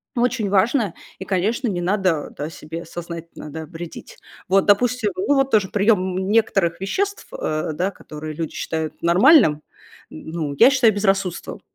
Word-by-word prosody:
очень 240 -4 0
важно. 205 - +2 0.2
И, 190 - -6
конечно, 215 +8 0
не 190 -5 -2
надо, 185 -4 0
да, 150 +2 -4
себе 165 +1 -8
сознательно, 170 -2 -8
да, 160 +1 -6
вредить. 165 0 -9 0.3
Вот, 195 +1 +3
допустим, 220 +1 +2
ну 235 +10 +1
вот 270 0 +1
тоже 205 -4 +3
приём 200 -3 +1
н 190 0 -2
некоторых 195 -6 +1
веществ, 400 - -2
э, 155 - -2
да, 180 +6 -1
которые 155 -4 -8
люди 160 0 -5
считают 160 -1 -4
нормальным, 175 - +5 0.5
н 80 - -10
ну 155 -4 -3
я 270 - +7
считаю 255 -4 +4
безрассудством, 195 -3 -1
190 Hz, 160 wpm, -21 LUFS, 165-220 Hz, 0.5 s, я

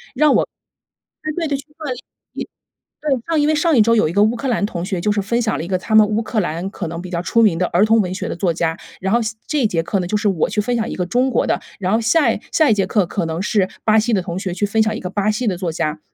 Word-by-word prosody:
让 300 +2 +4
我 - - +3 0.8
对 310 - -2 0.2
对 - - -6
对， 280 - 0
去 275 - -10
锻 315 - -8
炼， 255 -3 -2 0.9
一 295 -3 -3
对， 235 - -8
上 325 -2 +2
因 290 - +3
为 310 - +3
上 320 0 +2
一 225 - +7
周 230 +2 +3
有 185 - +3
一 - - -4
个 205 +2 +3
乌 220 +2 +2
克 265 +3 -3
兰 225 -4 +1
同 175 -5 -5
学 185 -2 -2
就 210 +4 +1
是 205 -1 0
分 235 +4 0
享 220 - 0
了 - - -3
一 - - -7
个 185 -1 0
他 215 +4 -3
们 215 -1 +7
乌 215 +2 0
克 220 0 -1
兰 175 +1 -2
可 185 -4 -5
能 165 +1 -5
比 185 - -8
较 170 -1 -2
出 230 +5 +2
名 205 -7 +4
的 180 - +1
儿 185 +5 +3
童 225 +1 +4
文 180 -1 -4
学 185 - -4
的 - - -3
作 180 -2 +1
家。 165 -1 -1 0.2
然 190 +2 -1
后 235 - +3
下 220 +1 -3
这 300 -2 0
一 - - +4
节 170 -5 0
课 195 +4 -1
呢， 180 - -3
就 210 - 0
是 210 0 +1
我 185 -6 +1
去 210 - 0
分 245 +4 -1
享 225 -1 -1
一 - - -4
个 180 - -1
中 250 +7 +1
国 - - +1
的。 - - 0 0.2
然 185 0 0
后 220 - +3
下 290 +8 +3
一 - - -5
下 315 -2 +4
一 - - +5
节 195 -2 +1
课 200 -3 +1
可 175 0 -2
能 160 +1 -3
是 200 -2 +1 0.2
巴 220 0 +4
西 225 +2 +1
的 190 -4 +2
同 175 -1 -5
学 190 -1 -3
去 205 - 0
分 220 +2 +2
享 215 0 -1
一 - - -6
个 180 - -4
巴 205 +1 0
西 235 +3 -2
的 190 - 0
作 180 -3 -2
家。 155 0 -2
210 Hz, 355 characters per minute, -19 LUFS, 180-235 Hz, 0.9 s, 一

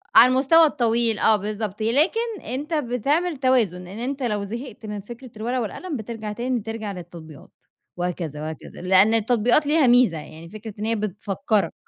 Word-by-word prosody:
على 250 +2 +9
المستوى 285 +6 +5
الطويل 235 -6 +1
آه 220 - +5
بالضبط، 210 0 -4
لكن 380 - +1
أنت 280 +7 -4
بتعمل 295 +5 0
توازن، 230 -9 +1
إن 200 +5 -8
أنت 270 +2 -3
لو 210 -4 -1
زهقت 230 +3 -7
من 210 -1 -5
فكرة 240 +4 -11
الورقة 245 +4 -1
والقلم 295 - -5
بترجع 220 -1 -6
تاني 245 +2 -1
ترجع 220 -1 -5
للتطبيقات، 170 -5 -11 0.5
وهكذا، 175 -4 -3
وهكذا، 155 +1 -8
لإن 190 +4 +4
التطبيقات 235 +5 +2
ليها 300 -3 +4
ميزة، 240 -9 +4
يعني 160 +2 -10
فكرة 215 +1 -9
إن 215 - -2
هي 230 +1 +1
بتفكّرك. 210 +2 -1
225 Hz, 160 wpm, -23 LUFS, 200-255 Hz, 0.5 s, على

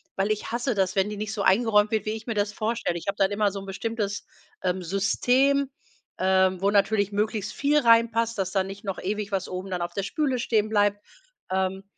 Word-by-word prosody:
weil 195 +2 0
ich 215 +1 -3
hasse 240 +1 0
das, 190 -2 0
wenn 195 +1 +2
die 210 - -5
nicht 215 +1 -4
so 210 - -3
eingeräumt 210 0 +4
wird, 215 -2 0
wie - - +1
ich 220 0 -7
mir 230 - -1
das 205 -1 -1
vorstelle. 215 -5 -2
Ich 170 - -9
habe 200 +1 -1
dann 195 0 +2
immer 205 -1 +1
so 200 - -5
'n 195 - -9
bestimmtes, 205 +1 -3 0.4
ähm, 185 0 0
System, 250 +10 +2 0.5
ähm, 190 0 +2
wo 200 - +2
natürlich 205 0 +2
möglichst 210 0 -1
viel 290 +1 +2
reinpasst, 230 -1 +3
dass 190 -1 -1
da 190 -2 +1
nicht 195 +3 -9
noch 195 -1 -3
ewig 205 +2 -3
was 190 -1 -1
oben 185 +1 -5
dann 180 -1 -3
auf 175 - -3
der 200 - -2
Spüle 265 +4 -1
stehenbleibt. 205 -3 +1 0.5
Ähm. 190 0 -1
205 Hz, 215 wpm, -26 LUFS, 195-225 Hz, 0.5 s, eingeräumt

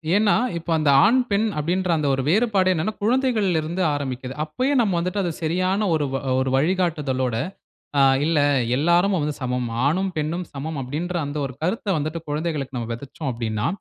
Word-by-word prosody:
ஏன்னா, 210 0 +4 0.2
இப்போ 170 0 -5
அந்த 155 -2 +2 0.2
ஆண் 250 +5 +4
பெண் 205 +2 +2
அப்படின்ற 180 +4 -1
அந்த 150 -2 0
ஒரு 135 - -1
வேறுபாடு 195 -1 +3
என்னான்னா, 180 +6 -1
குழந்தைகள்ல 220 -8 +2
இருந்து 170 +4 -3
ஆரம்பிக்குது. 130 -2 -4
அப்பயே 255 - -1
நம்ம 200 -5 +1
வந்துட்டு 180 +3 -1
அத 175 - -1
சரியான 185 +5 +1
ஒரு 150 -2 +1
வ - - 0
அ - - +1
ஒரு 130 0 0
வழிகாட்டுதலோட, 150 -6 0 0.6
ஆ - - +6 0.2
"இல்ல, 165 -1 +2 0.4
எல்லாரும் 175 +6 +3
வந்து 150 0 -2
சமம். 125 -1 -1 0.2
ஆணும் 190 +5 0
பெண்ணும் 160 +4 -2
சமம்." 150 +2 -4
அப்படின்ற 160 +8 -4
அந்த 145 +1 -5
ஒரு 130 -2 -7
கருத்த 200 +5 -2
வந்துட்டு, 155 +2 -3
குழந்தைகளுக்கு 145 -4 -3
நம்ம 115 -1 -4
வெதைச்சோம் 140 +3 -5
அப்படின்னா, 115 -1 -2
160 Hz, 175 wpm, -23 LUFS, 140-185 Hz, 0.6 s, ஆ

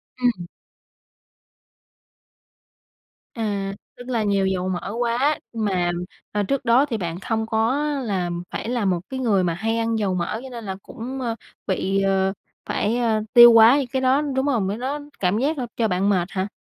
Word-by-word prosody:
Ừm. 235 -9 0 2.9
À, 200 -4 -2 0.2
tức 245 +1 -10
là 230 -3 0
nhiều 200 -1 +1
dầu 185 -1 -1
mỡ 185 +3 -3
quá, 245 +5 +1
mà, 190 -6 0 0.4
à, 205 0 0
trước 275 +5 -2
đó 250 +4 +5
thì 235 -6 -3
bạn 170 -2 -4
không 220 +2 -2
có 225 +6 +1 0.2
là 190 -6 -1 0.2
phải 230 - -5
là 240 -4 -1
một 180 -2 +1
cái 260 -1 -4
người 205 -7 +2
mà 170 - 0
hay 225 +7 -1
ăn 230 0 0
dầu 195 -3 0
mỡ 180 +4 -2
cho 265 - -8
nên 235 -3 -8
là 190 -1 -4
cũng, 255 +4 -7
ờ, 230 -2 -2 0.3
bị, 195 +1 0
ờ, 195 0 +1 0.3
phải, 220 +4 0
ờ, 225 -3 +1
tiêu 240 -1 +10
hóa 230 +4 +8
những 275 -4 -1
cái 265 +1 -2
đó, 260 +3 +3
đúng 270 -2 -1
không? 225 -9 +1
Cái 205 - -2
đó 270 +5 -3 0.2
cảm 185 +2 +1
giác 295 +4 0
là 250 - -3
cho 225 -2 +2
bạn 190 +1 +1
mệt 180 -3 +1
hả? 190 +1 -2
220 Hz, 190 wpm, -23 LUFS, 195-245 Hz, 2.9 s, tiêu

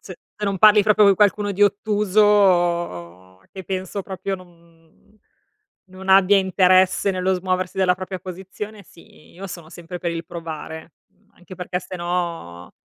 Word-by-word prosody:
z 190 - -10 0.3
se 210 - -3
non 195 -2 -2
parli 210 0 +6
proprio 210 0 +4
co' 200 -1 +6
qualcuno 205 +1 +2
di 205 +2 0
ottuso, 180 - +1
che 190 -2 -9
penso 190 +1 -4
proprio 195 0 -5
no, 185 -1 -11
mhmm, 170 +2 -26 0.7
non 190 +1 -11
abbia 195 +1 +5
interesse 185 +1 +3
nello 185 0 0
smuoversi 185 0 -2
dalla 185 -1 +2
propria 185 0 -6
posizione, 190 +3 -9
sì, 165 -3 -20
io 195 +3 -9
sono 170 -3 -9
sempre 175 +1 -9
per 170 -1 -3
il 165 0 -5
provare. 160 -1 -8
Mhmm, 205 0 -36
anche 180 +1 -13
perché 180 0 -4
'ste 185 - -9
no, 170 - -4
185 Hz, 160 wpm, -21 LUFS, 170-195 Hz, 0.7 s, parli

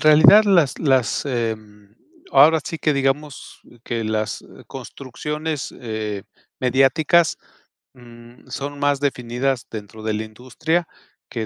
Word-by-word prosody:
realidad 155 +8 +7
las 175 -9 +3
las, 130 -7 +1
em, 110 -5 -4 0.4
ahora 150 +4 +6
sí 165 - -6
que 155 - +1
digamos 140 +1 -2 0.2
que 115 -2 -3
las 110 0 -2 0.2
construcciones, 150 +3 -5
eh, 110 -4 -4 0.4
mediáticas, 135 +6 +3 0.6
mm, 120 -1 -16
son 140 +1 -6
más 145 -1 +1
definidas 125 -1 -1
dentro 110 0 -9
de 110 - -1
la 110 +1 -2
industria 130 +10 -2 0.4
que 115 -2 -4
130 Hz, 115 wpm, -21 LUFS, 115-150 Hz, 0.6 s, realidad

